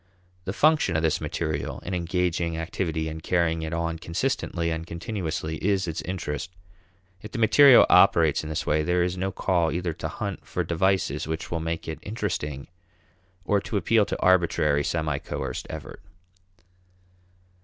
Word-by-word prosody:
The 95 - -2
function 150 - +3
of 80 - +1
this 80 - +1
material 75 -3 -3
in 95 - -5
engaging 85 -1 -1
activity 80 -1 -2
and 80 0 -6
carrying 80 -1 +1
it 80 0 -4
on 85 -1 -2
consistently 85 -2 -2
and 80 0 -3
continuously 85 -4 -4
is 95 -1 +1
its 85 0 -3
interest. 85 -2 -4 0.7
If 105 - -10
the - - -3
material 130 +4 +7
operates - - +5
in 75 - -7
this 80 - -3
way, 75 +1 +2
there 90 +2 +1
is 90 +1 -1
no 95 +1 -2
call 90 -4 +1
either 85 +1 -2
to - - -5
hunt - - -5
for - - -3
devices 95 -1 0
which 80 0 -4
will 85 - -1
make 80 0 -4
it 80 - -5
interesting 75 - -4 0.8
or 100 0 +2
to 105 - -3
appeal 110 +1 +3
to - - -3
arbitrary, 85 -5 +3
semi 75 -4 -1
coerced - - -5
effort. - - -8
85 Hz, 160 wpm, -25 LUFS, 80-95 Hz, 0.8 s, material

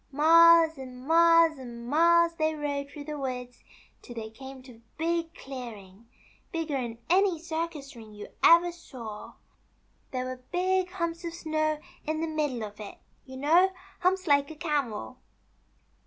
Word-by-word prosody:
" - - -40
Miles 325 +1 +6
and 255 -1 -10
miles 330 -2 +5
and 235 -2 -9
miles 335 +4 +4
they 315 -1 0
rode 285 -2 -3
through 290 0 -9
the 300 0 -6
woods 250 -2 -5 0.4
till 240 - -11
they 220 -1 -6
came 265 +2 -11
to 255 - -13
a - - -23 0.2
big 335 +1 -1
clearing, 230 - -10 0.4
bigger'n 275 -8 -3
any 370 +1 +3
circus 320 -4 -5
ring 220 -2 -12
you 210 0 -10
ever 340 +1 +6
saw. 240 -11 -10 0.8
There 255 -1 -3
were 255 0 -5
big 370 +1 +1
humps 335 -2 -4
of 335 -1 -5
snow 310 -2 -1 0.2
in 310 +1 -2
the 325 - -1
middle 295 -7 -2
of 210 0 -8
it 210 -2 -9 0.2
— - - -39
you 260 0 -9
know, 340 +7 +4 0.3
humps 370 +1 +1
like 285 -2 +3
a 315 - -9
camel." 280 - -3
300 Hz, 160 wpm, -28 LUFS, 255-335 Hz, 0.8 s, Miles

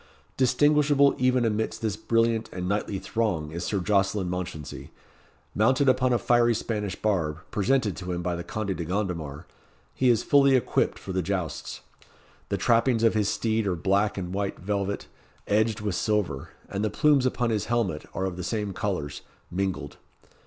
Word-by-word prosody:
Distinguishable 145 +1 +4
even 125 -1 +3
amidst 110 0 -1
this 110 -3 0
brilliant 115 +1 +1
and 90 0 -4
knightly 100 0 -1
throng 95 -8 -2
is 85 +2 -4
Sir 100 - -1
Jocelyn 95 -1 +1
Mounchensey. 85 -5 -5 0.6
Mounted 130 +6 +3
upon 130 0 +3
a 120 - +4
fiery 120 -1 +3
Spanish 105 -4 -3
barb, 85 -8 0
presented 110 -1 +1
to 90 0 -5
him 90 0 -3
by 90 0 -1
the 85 - -5
Conde 100 -1 -3
de 85 - -4
Gondomar, 85 -4 -3 0.5
he 130 - +2
is 115 -3 +3
fully 140 -1 +5
equipped 130 - +1
for 95 - -7
the 95 - +1
jousts. 90 -3 -3 0.7
The - - 0
trappings 115 0 +2
of 115 - +5
his 105 -2 +1
steed 110 0 0
are 90 - +1
black 100 +5 +1
and 90 -1 -4
white 100 0 -2
velvet, 100 +1 -2 0.4
edged 110 +1 +1
with 105 -2 -1
silver, 90 -8 -1 0.2
and 100 +1 -3
the 110 - +1
plumes 140 +3 +3
upon 120 -2 0
his 105 -2 0
helmet 115 -10 -1
are 95 - -1
of 90 -2 -4
the 90 - -4
same 105 0 -2
colours, 85 -8 -3 0.3
mingled. 95 0 -3
105 Hz, 170 wpm, -26 LUFS, 90-115 Hz, 0.7 s, fully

